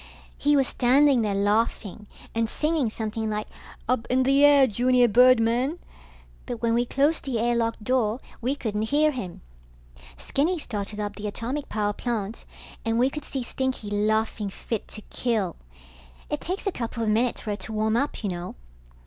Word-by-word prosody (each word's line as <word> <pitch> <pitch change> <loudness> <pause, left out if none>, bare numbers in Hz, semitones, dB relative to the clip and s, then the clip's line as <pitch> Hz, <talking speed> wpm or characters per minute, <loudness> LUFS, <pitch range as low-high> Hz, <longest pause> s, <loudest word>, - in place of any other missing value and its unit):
He 290 0 +2
was 270 -2 +3
standing 265 +1 +4
there 210 -2 0
laughing 205 0 0 0.3
and 225 -1 0
singing 305 -4 0
something 220 0 -3
like 210 0 -3 0.4
up 245 -1 0
in 260 +1 +3
the 275 +2 +4
air 285 -2 +7
junior 245 +2 +3
birdmen, 250 +5 +4 0.7
but 240 - -4
when 230 0 +1
we 240 +1 +1
closed 290 +6 +1
the 260 -4 -2
air 240 +2 +1
lock 230 -1 0
door, 235 -1 +1 0.2
we 255 +4 0
couldn't 220 -4 -2
hear 305 +1 +3
him. 200 -11 -6 0.8
Skinny 330 +6 0
started 210 -7 -4
up 205 -1 -4
the 210 0 -4
atomic 250 +7 -4
power 210 -1 0
plant, 225 -2 -4 0.4
and 225 0 0
we 255 +3 +3
could 300 0 -6
see 265 -2 -3
Stinky 255 -4 -3
laughing 215 0 0
fit 215 +2 -5
to 215 - -10
kill. 215 -8 -1 0.8
It - - -2
takes 370 +5 -3
a 395 - +1
couple 230 -5 -4
of 220 - 0
minutes 230 +3 +1
for 215 - -4
it 205 - -3
to - - -7
warm 220 0 0
up, 275 -1 -1
you 200 - -1
know. 175 0 -6
230 Hz, 175 wpm, -25 LUFS, 215-260 Hz, 0.8 s, air